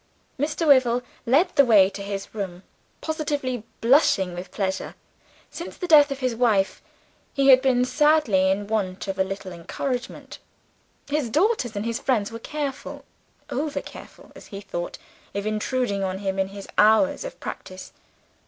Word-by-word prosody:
Mr. 300 +3 -1
Wyvil 250 -4 +4 0.2
led 285 +10 +3
the 280 - +7
way 210 -7 +6
to 200 +1 -8
his 200 0 -6
room, 190 -4 -5 0.4
positively 290 -6 -2 0.2
blushing 225 - +3
with 180 +2 -7
pleasure. 190 -1 -3 0.6
Since 340 - -8
the 360 - -4
death 300 -3 +7
of 275 0 -5
his 255 -2 0
wife 220 -5 +1 0.5
he 275 -1 +3
had 260 -1 +8
been 250 -2 +2
sadly 275 -10 +3
in 200 +2 0
want 200 -3 -2
of 195 0 -4
a - - +5
little 190 0 -6
encouragement. 245 +9 -5 0.7
His 290 -4 -1
daughters 310 - +1
and 205 +2 -3
his 230 +1 -2
friends 230 -7 0
were 230 - -7
careful 285 +1 -5 0.5
over 295 +2 -2
careful, - - -13
as - - -13
he 195 - -8
thought 175 -3 -5 0.4
of 200 0 -3
intruding 215 -1 -1
on 190 0 -2
him 195 -1 -3
in 190 - +1
his 195 0 -10
hours 220 - +4
of - - -8
practice. 185 -1 -8
230 Hz, 160 wpm, -24 LUFS, 195-280 Hz, 0.7 s, had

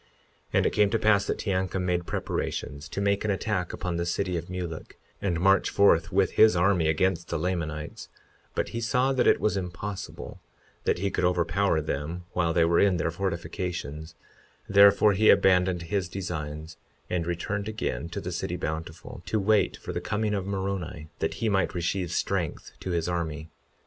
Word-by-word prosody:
52:17 - - -34 0.5
And - - +3
it - - +1
came 105 -1 +4
to 115 - +1
pass 105 -2 +3
that - - -1
Teancum 95 -2 -1
made 90 -1 -1
preparations 70 +1 -3
to - - -4
make 100 0 +1
an 110 - -1
attack 95 -2 -1
upon 90 -2 -3
the 85 - -1
city 90 +1 -1
of 85 +1 -4
Mulek, 90 -3 -6 0.2
and 90 -4 0
march 95 +2 +4
forth 85 -5 +4
with - - +2
his 110 -3 +6
army 90 -2 +3
against 85 +2 +1
the 85 - -2
Lamanites; 80 -3 -3 0.5
but - - -1
he 115 - -4
saw 125 +3 +2
that 130 -2 +2
it - - +5
was 105 -3 +1
impossible 95 -7 -6 0.5
that - - +2
he 100 +2 -1
could - - -1
overpower 90 0 +2
them 75 +4 -4
while 85 -2 +1
they 85 0 +3
were 85 0 +3
in 95 -3 +4
their 85 - 0
fortifications; 85 -4 -4 0.5
therefore 100 +1 +6
he 110 +3 +4
abandoned 90 -2 +4
his 90 +1 -2
designs 80 -4 -5 0.3
and 85 -2 -2
returned 100 +4 -2
again 85 - -3
to - - -4
the - - -5
city - - -3
Bountiful, 80 +1 -5
to 110 - 0
wait 105 +1 +2
for - - -7
the - - -3
coming 105 0 -1
of 100 -2 -2
Moroni, 95 -5 -3
that - - -1
he 115 - -1
might 95 -2 +1
receive 90 0 -1
strength 90 -2 -2
to - - -5
his 85 -2 0
army. 80 -3 -3
90 Hz, 185 wpm, -27 LUFS, 85-100 Hz, 0.5 s, his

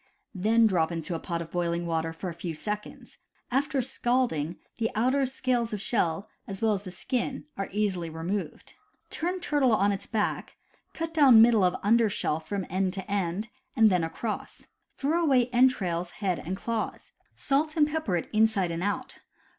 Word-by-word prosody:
Then 220 +4 +3
drop 175 -6 +2
into 165 0 -3
a 165 - -2
pot 170 0 -3
of 165 - -14
boiling 170 -1 -1
water 165 -1 -1
for 165 +3 -6
a 175 - -4
few 165 -1 -5
seconds. 210 +6 -6 0.3
After 270 0 +1
scalding, 240 - 0 0.2
the 225 -1 +1
outer 260 +5 +2
scales 250 -3 -1
of 210 - -2
shell, 195 -4 0 0.2
as 195 -1 -5
well 220 -1 +2
as 195 - -2
the 195 - -8
skin, 255 +8 -3
are 195 - -4
easily 190 -5 0
removed. 165 +2 -4 0.4
Turn 360 +3 -1
turtle 290 -8 +2
on 205 -1 +3
its 195 - -4
back, 215 -3 -2 0.4
cut 330 0 -4
down 275 -8 +7
middle 230 -4 +5
of 180 -1 +3
under 225 +2 +4
shell 155 -5 -1
from 190 +4 -4
end 185 +1 0
to 190 -1 -5
end, 200 +2 -1 0.3
and 220 -4 +6
then 180 -2 +2
across. 210 +7 -5 0.3
Throw 315 +5 +1
away 255 -5 +3
entrails, 190 -9 +2
head, 185 -2 -2
and 185 +3 -3
claws. 230 +1 -4 0.2
Salt 305 +3 0
and 295 -1 +5
pepper 300 - -1
it 165 - -4
inside 215 -5 +3
and 165 +1 -3
out. 205 +2 -3
210 Hz, 180 wpm, -28 LUFS, 175-245 Hz, 0.4 s, down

